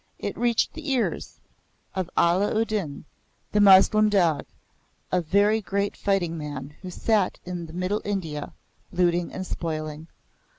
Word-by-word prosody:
it -, -, -4 dB
reached 235 Hz, -2 st, +1 dB
the 310 Hz, -2 st, -6 dB
ears 255 Hz, -3 st, -1 dB, 0.5 s
of 185 Hz, -2 st, -3 dB
Allah 185 Hz, +5 st, +3 dB
u 225 Hz, -, +2 dB
Din, 190 Hz, -11 st, -4 dB, 0.5 s
the 210 Hz, -, +3 dB
Moslem 205 Hz, +2 st, +7 dB
dog, 175 Hz, -8 st, +2 dB, 0.6 s
a 180 Hz, -, +2 dB
very 205 Hz, +6 st, +3 dB
great 200 Hz, +1 st, -1 dB
fighting 185 Hz, -4 st, 0 dB
man 145 Hz, -1 st, -6 dB
who 185 Hz, -, -7 dB
sat 205 Hz, +1 st, +1 dB
in 175 Hz, -2 st, -5 dB
Middle 185 Hz, +5 st, -2 dB
India, 165 Hz, -8 st, -4 dB, 0.4 s
looting 175 Hz, -1 st, +1 dB
and 185 Hz, -, -5 dB
spoiling. 155 Hz, -2 st, -4 dB
185 Hz, 135 wpm, -25 LUFS, 165-205 Hz, 0.6 s, Moslem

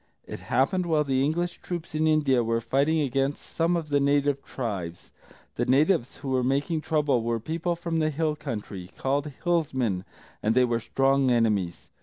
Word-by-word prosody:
It -, -, -7 dB
happened 175 Hz, +8 st, +1 dB
while 155 Hz, -2 st, +2 dB
the 135 Hz, -2 st, +1 dB
English 175 Hz, +4 st, -1 dB
troops 170 Hz, -3 st, -6 dB
in 155 Hz, +1 st, +1 dB
India 145 Hz, -6 st, +3 dB
were 115 Hz, 0 st, 0 dB
fighting 140 Hz, +7 st, +1 dB
against 135 Hz, +1 st, -1 dB
some 170 Hz, +1 st, 0 dB
of 160 Hz, -2 st, -5 dB
the 145 Hz, 0 st, +3 dB
native 140 Hz, 0 st, +1 dB
tribes. 95 Hz, -11 st, -5 dB, 0.5 s
The -, -, +1 dB
natives 140 Hz, 0 st, +2 dB
who 135 Hz, -, -6 dB
were 130 Hz, -1 st, +1 dB
making 140 Hz, +5 st, 0 dB
trouble 150 Hz, -6 st, +1 dB
were 115 Hz, 0 st, -1 dB
people 165 Hz, +7 st, -2 dB
from 170 Hz, -1 st, -2 dB
the 155 Hz, -1 st, +2 dB
hill 155 Hz, 0 st, -1 dB
country, 100 Hz, -8 st, -6 dB
called 145 Hz, +2 st, -1 dB
Hillsmen, 130 Hz, -, 0 dB, 0.4 s
and 110 Hz, +2 st, +1 dB
they 130 Hz, 0 st, +5 dB
were 120 Hz, -1 st, 0 dB
strong 135 Hz, +2 st, +2 dB
enemies. 105 Hz, -7 st, +1 dB
140 Hz, 175 wpm, -26 LUFS, 120-155 Hz, 0.5 s, they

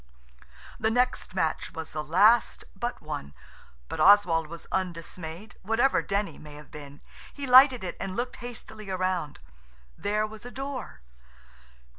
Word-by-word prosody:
The 220 Hz, -, +2 dB
next 245 Hz, -4 st, 0 dB
match 160 Hz, -4 st, -1 dB
was 160 Hz, -1 st, -7 dB
the 155 Hz, 0 st, -4 dB
last 205 Hz, +10 st, +4 dB
but 240 Hz, +5 st, -4 dB
one, 150 Hz, -, -6 dB, 0.5 s
but -, -, -6 dB
Oswald 180 Hz, -5 st, +5 dB
was 170 Hz, +1 st, -9 dB
undismayed, 175 Hz, +1 st, -5 dB
whatever 225 Hz, +7 st, +2 dB
Denny 200 Hz, +1 st, -2 dB
may 150 Hz, -1 st, -11 dB
have 150 Hz, -1 st, -13 dB
been. 145 Hz, -1 st, -11 dB, 0.3 s
He 285 Hz, -, -6 dB
lighted 255 Hz, -2 st, +7 dB
it 180 Hz, -, -5 dB
and 185 Hz, -1 st, -4 dB
looked 245 Hz, +2 st, -3 dB
hastily 220 Hz, -4 st, -9 dB
round. 185 Hz, -5 st, -1 dB, 0.6 s
There 210 Hz, +2 st, 0 dB
was 215 Hz, 0 st, -10 dB
a 245 Hz, -, -7 dB
door. 265 Hz, -, -6 dB
195 Hz, 140 wpm, -27 LUFS, 165-235 Hz, 0.6 s, lighted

